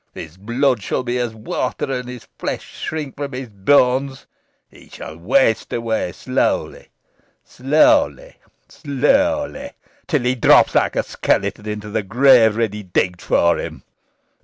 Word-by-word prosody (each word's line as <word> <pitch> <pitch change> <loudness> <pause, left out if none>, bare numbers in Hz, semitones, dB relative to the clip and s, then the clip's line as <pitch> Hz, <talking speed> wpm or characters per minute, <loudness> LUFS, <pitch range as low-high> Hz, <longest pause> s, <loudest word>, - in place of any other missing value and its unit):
His 80 +1 -9
blood 120 +5 0
shall 115 - -2
be 125 0 -2
as 120 -2 -3
water, 125 +4 -3
and 125 -1 -4
his 125 -2 -10
flesh - - -5
shrink 150 -4 -5
from 140 -1 -5
his 125 -1 -6
bones. 130 +5 +1 0.4
He - - -19
shall 80 - -9
waste 110 +7 +1
away 115 -6 -2
slowly - - -2 0.6
slowly 285 - +1 0.3
slowly 280 - -1 0.3
till 150 -7 0
he 125 +1 +1
drops 125 - +4
like - - +1
a - - +1
skeleton 100 +2 -2
into 105 0 -6
the 110 +1 -1
grave 115 +1 +4
ready 110 -2 -2
digged 90 -2 -1
for 85 0 +2
him. - - -7
125 Hz, 135 wpm, -19 LUFS, 105-140 Hz, 0.6 s, drops